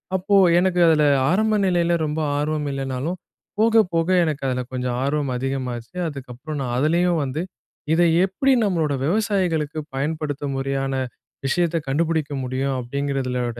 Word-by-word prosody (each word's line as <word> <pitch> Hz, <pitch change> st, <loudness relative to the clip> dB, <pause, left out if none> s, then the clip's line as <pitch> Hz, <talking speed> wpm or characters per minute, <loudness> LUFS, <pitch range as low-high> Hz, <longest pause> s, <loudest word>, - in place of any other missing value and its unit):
அப்போ 195 Hz, +2 st, +1 dB, 0.2 s
எனக்கு 180 Hz, -1 st, +1 dB
அதுல 155 Hz, -2 st, +4 dB, 0.3 s
ஆரம்ப 215 Hz, +3 st, +2 dB
நிலையில 175 Hz, -2 st, +2 dB
ரொம்ப 150 Hz, +1 st, -2 dB, 0.2 s
ஆர்வம் 150 Hz, 0 st, -1 dB
இல்லைனாலும், 135 Hz, +5 st, -3 dB, 0.4 s
போக, 225 Hz, 0 st, +5 dB
போக 165 Hz, 0 st, +1 dB, 0.2 s
எனக்கு 150 Hz, -4 st, -2 dB
அதில 125 Hz, 0 st, -1 dB
கொஞ்சம் 125 Hz, -1 st, -2 dB
ஆர்வம் 140 Hz, -1 st, 0 dB
அதிகமாச்சு. 130 Hz, 0 st, -4 dB
அதுக்கப்புறம் 140 Hz, +1 st, -7 dB
நான் 120 Hz, -2 st, -2 dB
அதுலேயும் 170 Hz, +3 st, +2 dB
வந்து 140 Hz, +5 st, -3 dB, 0.5 s
இத, 170 Hz, -, +3 dB, 0.2 s
எப்டி 195 Hz, +8 st, +1 dB
நம்மளோட 165 Hz, -8 st, +1 dB
விவசாயிகளுக்கு 175 Hz, -6 st, 0 dB, 0.2 s
பயன்படுத்தும் 145 Hz, 0 st, -2 dB
முறையான 135 Hz, 0 st, -2 dB, 0.5 s
விஷயத்த 170 Hz, +4 st, +1 dB
கண்டுபிடிக்க 155 Hz, +1 st, 0 dB
முடியும்? 130 Hz, +2 st, -1 dB
அப்டிங்கறதுலோட 125 Hz, -2 st, -2 dB
150 Hz, 130 wpm, -22 LUFS, 135-170 Hz, 0.5 s, போக